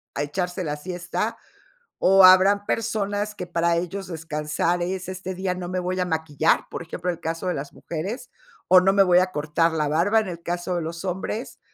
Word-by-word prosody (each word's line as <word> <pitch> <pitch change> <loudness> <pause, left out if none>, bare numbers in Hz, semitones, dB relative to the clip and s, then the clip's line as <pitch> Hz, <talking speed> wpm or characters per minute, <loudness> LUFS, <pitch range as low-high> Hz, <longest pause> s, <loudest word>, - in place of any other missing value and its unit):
a 145 - -1
echarse 180 +4 -3
la 150 -1 -2
siesta, 175 +3 -4 0.6
o 195 0 +6
habrán 195 +2 +6
personas 210 -2 -1
que 180 - -5
para 170 0 +1
ellos 180 +3 -4
descansar 160 +1 -2
es 185 +1 -3
este 185 0 -5
día 185 0 -1
no 180 -1 -6
me 185 +1 -2
voy 185 +1 -2
a - - +2
maquillar, 160 -2 +1
por - - -4
ejemplo, 175 +2 -6
el 170 - -10
caso 165 +3 -4
de 180 - 0
las 140 +1 -6
mujeres, 190 - -6 0.4
o 185 0 +8
no 190 +1 +3
me 195 0 +5
voy 180 -1 +5
a 185 - +2
cortar 155 +2 +1
la 155 -2 0
barba 170 +9 +3
en 215 - -4
el 170 -2 -7
caso 175 +1 -3
de 170 - -1
los 170 +3 -6
hombres 190 +5 -4
180 Hz, 205 wpm, -24 LUFS, 165-190 Hz, 0.6 s, o